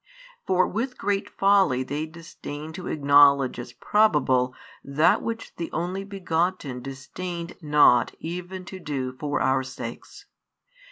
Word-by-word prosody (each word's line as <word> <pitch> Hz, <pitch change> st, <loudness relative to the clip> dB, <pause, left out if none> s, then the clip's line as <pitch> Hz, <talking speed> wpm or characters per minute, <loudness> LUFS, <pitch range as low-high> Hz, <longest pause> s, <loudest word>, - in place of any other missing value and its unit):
For 185 Hz, -1 st, +3 dB
with 250 Hz, +5 st, -3 dB
great 200 Hz, -1 st, -1 dB
folly 195 Hz, -10 st, +3 dB
they 145 Hz, +4 st, -3 dB
disdain 160 Hz, -2 st, -9 dB
to 180 Hz, +1 st, -7 dB
acknowledge 140 Hz, -3 st, +4 dB
as 120 Hz, 0 st, -7 dB
probable 130 Hz, -, +2 dB, 0.3 s
that 145 Hz, +4 st, +3 dB
which 225 Hz, 0 st, -5 dB
the 170 Hz, -, -4 dB
Only 180 Hz, +4 st, -3 dB
Begotten 175 Hz, -8 st, -2 dB
disdained 170 Hz, +6 st, -6 dB
not 150 Hz, -5 st, +4 dB
even 180 Hz, +2 st, -6 dB
to 190 Hz, 0 st, -8 dB
do 135 Hz, -6 st, -3 dB
for 145 Hz, -1 st, -1 dB
our 130 Hz, 0 st, +2 dB
sakes. 130 Hz, -, -8 dB
160 Hz, 125 wpm, -25 LUFS, 140-185 Hz, 0.3 s, acknowledge